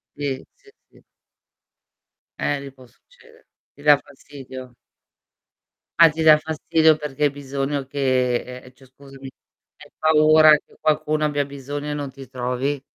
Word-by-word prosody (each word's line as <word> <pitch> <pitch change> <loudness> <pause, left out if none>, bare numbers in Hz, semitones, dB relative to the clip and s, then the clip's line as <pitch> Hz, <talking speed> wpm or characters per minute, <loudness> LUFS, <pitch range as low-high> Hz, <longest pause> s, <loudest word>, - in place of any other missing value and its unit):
Sì, 140 -2 -4
sì, 410 - -23 0.2
sì. - - -23 1.4
Eh, 145 -1 -1
lì 140 -1 -9
può 130 -1 -17
succedere. 470 - -24 0.3
Ti 145 - -18
dà 150 -1 +6
fastidio? 130 -3 -12 1.3
Ah, 165 -1 +8
ti 160 +1 -4
dà 155 -1 +7
fastidio 160 0 +2
perché 150 -1 -2
hai 145 - +3
bisogno 140 0 -4
che 130 -3 0 0.2
ehm, 125 - -15
cioè 130 +1 -20
scusami, 135 0 -13 0.5
hai - - -16
paura 155 0 +5
che - - -22
qualcuno 155 0 0
abbia 145 -1 0
bisogno 145 +1 -7
e - - -2
non 145 -2 -5
ti 135 0 -12
trovi? 130 +2 -3
145 Hz, 145 wpm, -21 LUFS, 135-150 Hz, 1.4 s, Ah